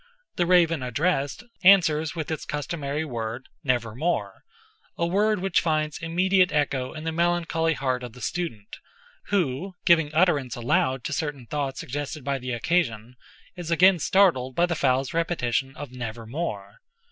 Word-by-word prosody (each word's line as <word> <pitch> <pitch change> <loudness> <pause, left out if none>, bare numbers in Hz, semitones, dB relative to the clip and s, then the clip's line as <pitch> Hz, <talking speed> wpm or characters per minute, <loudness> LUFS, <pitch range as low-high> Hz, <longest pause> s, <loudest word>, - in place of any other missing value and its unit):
The 175 - +1
raven 170 -4 +4
addressed, 140 - -1 0.2
answers 165 -5 +5
with 160 -1 -4
its 160 - -3
customary 150 0 -3
word, 120 -2 -5 0.2
"Nevermore"—a 125 - -3
world 205 +4 +2
which 190 0 +1
finds 155 -2 -1
immediate 180 +2 +2
echo 135 -3 0
in 155 - -7
the 160 - -2
melancholy 165 -1 +1
heart 130 -2 -1
of 120 -2 -8
the 125 - -13
student, 140 -14 -4 0.5
who, 180 -1 -1
giving 165 -4 +4
utterance 155 -6 +2
aloud 125 +1 0
to 155 - -3
certain 145 -4 -3
thoughts 140 +1 -3
suggested 145 +2 -5
by 140 0 -1
the 125 0 -6
occasion, 120 -3 -1 0.4
is 175 -3 -7
again 180 +2 +5
startled 160 -7 +3
by 175 - +4
the 175 - -1
fowl's 135 -3 +1
repetition 135 -5 -1
of 145 -4 -8
"Nevermore." 115 -3 -5
150 Hz, 145 wpm, -25 LUFS, 125-170 Hz, 0.5 s, answers